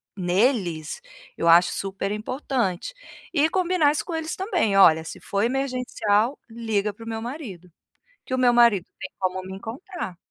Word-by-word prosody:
neles 180 - 0 0.4
eu 170 - 0
acho 170 +1 +6
super 195 0 -3
importante, 230 - -2 0.4
e 310 -1 +3
combinar 360 -4 +2
isso 300 - -2
com 350 - -5
eles 320 0 -3
também: 360 - 0
"Olha 160 -4 +6
se 160 - -8
for 200 - -2
emergencial 250 -2 0
liga 220 -3 -1
para 225 - -13
o - - -6
meu 225 -1 -3
marido, 230 - -7 0.6
que 260 - -3
o - - 0
meu 250 -1 +4
marido 235 -6 +5 0.2
tem - - -6
como 185 -1 -1
me 190 +1 -8
encontrar". 225 - -7
225 Hz, 165 wpm, -24 LUFS, 190-270 Hz, 0.6 s, acho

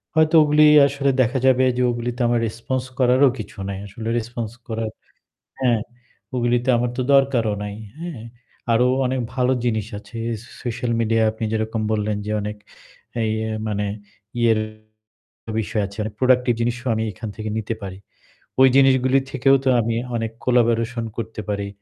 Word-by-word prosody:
হয়তো 160 +1 +4
ওগুলি 150 0 +5 0.2
আসলে 140 0 0
দেখা 125 +2 +1
যাবে 130 0 +5
যে - - +1
ওগুলিতে 120 +1 -3
আমার 120 0 +2
response 125 +4 -3
করারও 130 +2 +5
কিছু 120 - -8
নাই। 100 -1 -4
আসলে 110 +3 -7
response 115 -1 -5
করার 110 -1 -3 0.7
হ্যাঁ, 120 -4 +2 0.6
ওগুলিতে 120 +1 +1
আমার 120 +1 0
তো 130 - 0
দরকারও 130 -6 +3
নাই। 105 0 -5 0.2
হ্যাঁ, 165 -9 -6 0.5
আরও 120 +2 +4 0.2
অনেক 130 0 0
ভালো 125 0 +2
জিনিস 110 -3 0
আছে 110 +3 -12 0.3
স - - -15 0.2
social 120 0 -2
media 115 0 +2
আপনি 110 +1 -5
যেরকম 110 0 -1
বললেন 105 -1 0
যে - - -3
অনেক 105 +1 -4 0.7
এই 110 - 0 0.2
এ - - -3 0.2
মানে 105 -1 -1 0.5
ইয়ের 115 -2 +4 1.0
বিষয় 105 0 -1
আছে, 100 +1 -12
অনেক 105 -1 -6
productive 125 -2 +3
জিনিসও 120 +2 -2
আমি 110 0 -1
এখান 110 - -7
থেকে 110 +1 -4
নিতে 110 +1 -3
পারি। 95 -1 -6 0.6
ওই 130 - +8
জিনিসগুলি 130 -1 +5
থেকেও 135 +1 +4
তো - - +2
আমি 115 0 -1 0.2
অনেক 115 -1 -2
collaboration 120 -1 +2
করতে 110 -1 -5
পারি, 100 -1 -2
120 Hz, 160 wpm, -22 LUFS, 110-130 Hz, 1.0 s, ওই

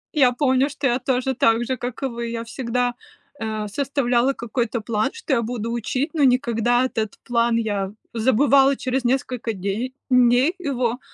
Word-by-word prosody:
Я 260 -4 +5
помню, 260 +1 +2
что 280 -1 -2
я 245 +1 +1
тоже 260 +1 0
так 230 +1 +3
же, 260 - -1
как 245 +1 -5
и - - -1
вы. 235 -2 -4
Я 230 0 -4
всегда, 245 0 -1 0.4
э, 215 -2 -3
составляла 260 +1 +1
какой-то 235 -1 -2
план, 215 0 -1
что 460 -11 -3
я 235 - +2
буду 230 0 -3
учить, 255 +5 -2
но 305 -3 +1
никогда 245 -1 +2
этот 220 -5 -3
план 235 -1 +2
я 205 -4 -1 0.2
забывала 270 +4 +4
через 260 0 -1
несколько 250 -2 -1
дей 200 +7 -3 0.2
дней 250 +6 +4
его 255 -7 -1
245 Hz, 165 wpm, -22 LUFS, 230-265 Hz, 0.4 s, Я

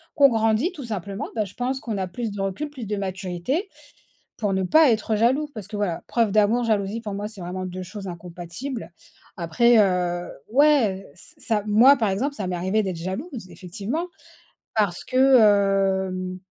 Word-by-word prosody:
qu'on 285 -2 +7
grandit 225 - +1
tout 295 - -8
simplement. 200 -3 -4
Bah, 215 -2 0
je 190 - -12
pense 255 +2 -2
qu'on 225 -5 -4
a 190 -1 -2
plus 220 +5 -4
de 200 -1 -5
recul, 195 +10 -3
plus 260 -6 -7
de 210 - -1
maturité, 195 - -3 0.7
pour 205 -3 0
ne 190 - 0
pas 310 - +5
être 220 -1 0
jaloux. 260 +7 +2
Parce 215 -5 -7
que 215 - -6
voilà, 200 -5 -2
preuve 230 -3 +2
d'amour, 215 +3 +3
jalousie, 215 -1 0
pour 210 -3 -5
moi, 205 +1 -3
c'est 215 -3 -12
vraiment 185 +1 -4
2 185 0 -6
choses 195 +2 -8
incompatibles. 175 +5 -7 0.4
Après 195 +8 +3
heu, 180 -3 +1 0.2
ouais 255 -9 +3
ç 175 - -11
ça, 215 -3 -1
moi, 235 +7 +6
par 220 -5 +1
exemple, 260 +9 -1
ça 205 -8 -4
m'est 180 -1 -2
arrivé 190 +5 +1
d'être 185 -3 -3
jalouse 190 - -6
effectivement. 200 - -4 0.7
Parce 205 -5 0
que - - -5 0.9
hem 185 0 -5
205 Hz, 180 wpm, -24 LUFS, 185-235 Hz, 0.9 s, qu'on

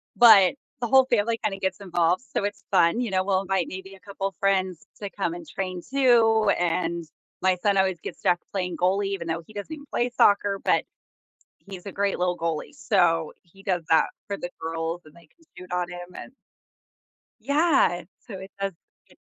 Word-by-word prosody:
but, 220 -2 +8 0.3
the 240 - 0
whole 265 +2 +6
family 230 -1 +1
kinda 195 -1 -1
gets 190 +1 -2
involved, 175 +2 +1
so 205 - 0
it's 205 - -5
fun. 175 +4 +4
You 235 -4 -2
know, 185 -1 +2
we'll 190 -1 +2
invite 190 -3 -1
maybe 190 +1 -8
a - - -18
couple 195 0 -4
friends 190 -3 0
to 200 - -4
come 190 -4 -2
and 175 -1 -8
train 185 +1 -4
too, 230 -4 +3
and 170 -1 -1 0.4
my 185 0 +3
son 205 -1 +2
always 190 -3 +2
gets - - -8
stuck 175 - +2
playing 180 -2 -2
goalie, 195 +3 +1
even 195 -4 -4
though 165 0 -2
he 215 - -16
doesn't 205 +9 -6
even 290 -2 -9
play 240 -1 0
soccer, 200 -1 +4
but, - - +2 0.8
he's 190 -2 -9
a 200 - -5
great 200 0 0
little 180 0 0
goalie. 165 - -3
So 175 - +1
he 185 +3 -19
does 180 -4 -1
that 160 - +6 0.2
for 200 - -2
the 175 - -5
girls 165 +1 -3
and 155 - -16
they 170 0 -19
can 330 - -29
shoot 180 0 -11
on 180 0 -1
him 175 0 -9
and - - -9 1.1
Yeah, 280 - +2 0.2
so 225 - -11
it 190 +1 -10
has 195 0 -2 0.4
e - - -19
190 Hz, 195 wpm, -25 LUFS, 175-205 Hz, 1.1 s, but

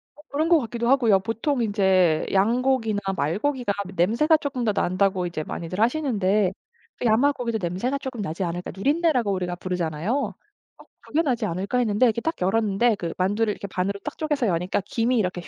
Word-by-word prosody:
어 295 - -16
그런 310 +4 0
것 335 - +6
같기도 235 -2 -2
하고요. 235 -7 +4
보통 230 +6 -1
인제 190 -6 +2
"양고기나 225 +1 +2 0.2
말고기가 205 - -1 0.2
냄새가 235 - +3
쪼끔 270 -4 -3
더 215 -3 +1
난다."고 185 0 +1
이제 170 -3 -4
많이들 175 +5 -5
하시는데 215 -7 +1 0.5
'야마 245 +5 +4
고기도 235 -4 -2
냄새가 190 +11 -1
쪼끔 265 -5 -6
나지 190 0 -3
않을까' 175 +1 -4
누린내라고 275 - +1
우리가 180 -2 -2
부르잖아요. 180 +1 -2 0.6
'어 - - -15 0.2
그게 310 - 0
나지 260 -7 0
않을까.' 195 +8 -1
했는데 225 +1 +2
이렇게 235 0 +1
딱 325 +5 -1
열었는데 215 +3 +2
그 170 -4 -5
만두를 205 +4 +1
이렇게 200 - -7
반으로 195 +2 -2
딱 300 - -6
쪼개서 295 -6 0
여니까 180 +2 0
김이 235 +3 0
이렇게 180 -3 -1
쫙 - - -13
215 Hz, 425 characters per minute, -24 LUFS, 185-250 Hz, 0.6 s, 것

